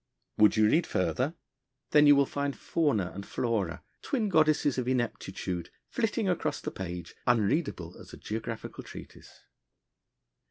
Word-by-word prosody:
Would 105 0 +6
you 110 0 +5
read 160 +10 +3
further? 140 +7 0 0.6
Then 150 0 +7
you 145 - +9
will 140 0 +4
find 140 0 -3
Fauna 135 - 0
and 100 - -6
Flora, 100 -8 -2 0.2
twin 230 -7 -1
goddesses 155 -5 +3
of 125 - -2
ineptitude, 100 -7 -2 0.2
flitting - - 0
across - - 0
the - - -5
page, 90 -2 -6
unreadable 110 - +1
as - - -12
a - - -10
geographical 110 +1 -5
treatise. - - -12
120 Hz, 135 wpm, -29 LUFS, 100-145 Hz, 0.6 s, you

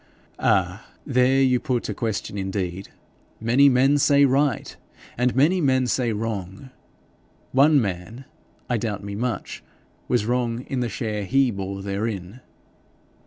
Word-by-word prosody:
'Ah, 95 +1 +1 0.2
there 130 0 +3
you 125 -2 +3
put 125 -5 -2
a 105 - -3
question 110 -1 -3
indeed! 95 -1 -4 0.5
Many 125 +5 +4
men 135 +3 +3
say 140 0 +5
RIGHT, 140 -2 0 0.4
and 125 0 0
many 165 +8 +3
men 130 -3 +2
say 120 -1 0
WRONG. 105 +2 -5 0.8
One 145 +3 +5
man, 105 +4 -4 0.4
I 120 - 0
doubt 105 -3 -3
me 100 0 -6
much, 115 -1 -4 0.4
was 120 -4 +1
wrong 120 0 -1
in 130 0 -4
the 120 -1 -1
share 105 +1 -3
HE 135 +4 +2
bore 95 -1 -5
therein.' 100 +1 -4
120 Hz, 135 wpm, -23 LUFS, 100-130 Hz, 0.8 s, say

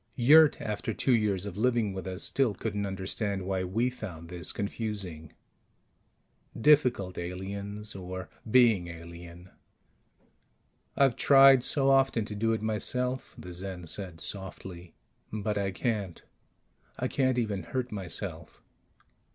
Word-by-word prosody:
Yurt, 150 +5 +6
after 105 0 -3
two 135 - +1
years 100 -4 0
of 100 - -6
living 115 -3 +1
with 95 0 -6
us, 95 0 -4
still 130 -7 +1
couldn't 100 0 -3
understand 95 0 -2
why 95 -1 -1
we 110 +7 0
found 90 -10 -7
this 90 -2 -3
confusing. 100 -7 -4 1.3
Difficult, 125 - +3
aliens 100 +4 -5
or 95 -2 -6 0.2
being 110 -7 +4
alien. 85 +1 -11 1.5
"I've 135 -4 +4
tried 135 -2 +7
so 135 0 +3
often 135 -5 +3
to 105 - -7
do 115 +2 +1
it 110 -1 -1
myself," 125 +4 -1
the 90 - -9
Zen 90 -1 -6
said 90 0 -3
softly. 90 -3 -6 0.4
"But 105 -1 -2
I 100 -1 0
can't. 100 -3 -3 0.7
I - - -1
can't 130 -2 +1
even 105 -5 -1
hurt 125 +9 -4
myself. 95 -6 -5
100 Hz, 125 wpm, -29 LUFS, 90-120 Hz, 1.5 s, tried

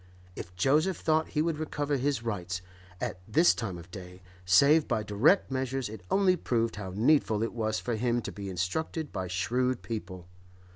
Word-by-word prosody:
If 90 +1 -8
Joseph 150 - +2
thought 160 0 +1
he 150 - +4
would 165 -2 -1
recover 145 -2 -2
his 135 -3 -1
rights, 90 -5 -3 0.4
at 90 - -4
this 160 +11 +5
time 100 -6 -4
of 85 +1 -12
day, 90 0 -10 0.2
save 140 - +5
by 110 - 0
direct 125 - +3
measures, 130 -2 -2
it 110 -2 -9
only 190 -2 +4
proved 115 -9 -1
how 95 -3 -6
needful 110 -2 +3
it 115 - -3
was 110 -2 -1
for 120 - -2
him 120 +1 0
to - - -5
be 100 -2 -7
instructed 145 - -3
by 95 -1 -4
shrewd 125 +8 -1
people. 95 -6 -6
115 Hz, 180 wpm, -29 LUFS, 95-145 Hz, 0.4 s, this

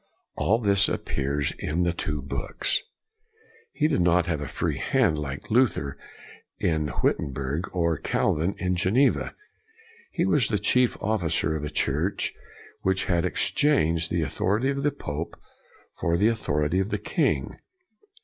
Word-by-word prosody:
All 110 - +2
this 100 -4 +3
appears 70 +1 -1
in 85 +4 0
the 85 -1 +1
two 75 -4 -3
books. 70 - -1 0.9
He 155 - +1
did 95 - +1
not 90 0 +3
have 80 -4 -2
a 75 - -4
free - - -2
hand 75 - +2
like 70 +3 -6
Luther 110 - +2 0.6
in 80 -3 0
Witten 70 - 0
berg 70 +6 -3
or 85 -3 0
Calvin 85 +6 0
in 90 -1 0
Geneva. 115 +10 +2 0.7
He 170 -1 0
was 150 - +3
the 105 - +1
chief 125 +3 +2
officer 85 -6 0
of 75 - -4
a 75 - -3
church 75 +5 -1 0.5
which 95 0 +1
had 85 -1 +1
ex - - 0
changed 85 - +2
the 85 -2 0
authority 105 - 0
of 140 0 -2
the 145 - +2
pope 80 - -5 0.6
for 85 0 +1
the 105 +5 +4
authority 75 -6 0
of 95 +1 0
the - - 0
king. - - -1
85 Hz, 150 wpm, -26 LUFS, 75-105 Hz, 0.9 s, the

